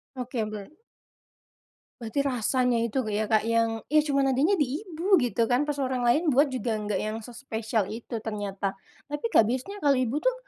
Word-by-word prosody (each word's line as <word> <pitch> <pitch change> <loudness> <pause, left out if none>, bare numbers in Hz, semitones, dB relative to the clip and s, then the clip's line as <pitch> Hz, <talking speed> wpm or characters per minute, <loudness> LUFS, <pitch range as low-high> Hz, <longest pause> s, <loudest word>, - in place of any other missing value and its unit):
Oke, 250 -3 -3
ber 215 +4 -7 1.3
Berarti 235 +5 -1
rasanya 250 -1 +1
itu 235 +2 -2 0.2
ya 215 0 -1
Kak 220 -1 +3
yang 230 -1 0
ya 305 +1 +4
cuman 275 -2 +1
adanya 310 +10 +3
di 290 +3 0
ibu 370 -1 +2
gitu 235 -1 +1
kan 255 +5 +1
pas 290 - -1
orang 260 -2 -1
lain 290 +6 +3
buat 285 +3 +4
juga 245 -3 -2
nggak 210 -2 -2
yang 215 +3 -3
sespesial 225 -3 -3
itu 230 0 -5
ternyata. 200 -2 -3 0.3
Tapi 295 +4 -5
Kak 225 - +5
biasanya 260 - -3
kalau 290 -7 +3
ibu 255 +1 0
tuh - - +1
250 Hz, 180 wpm, -27 LUFS, 225-285 Hz, 1.3 s, Kak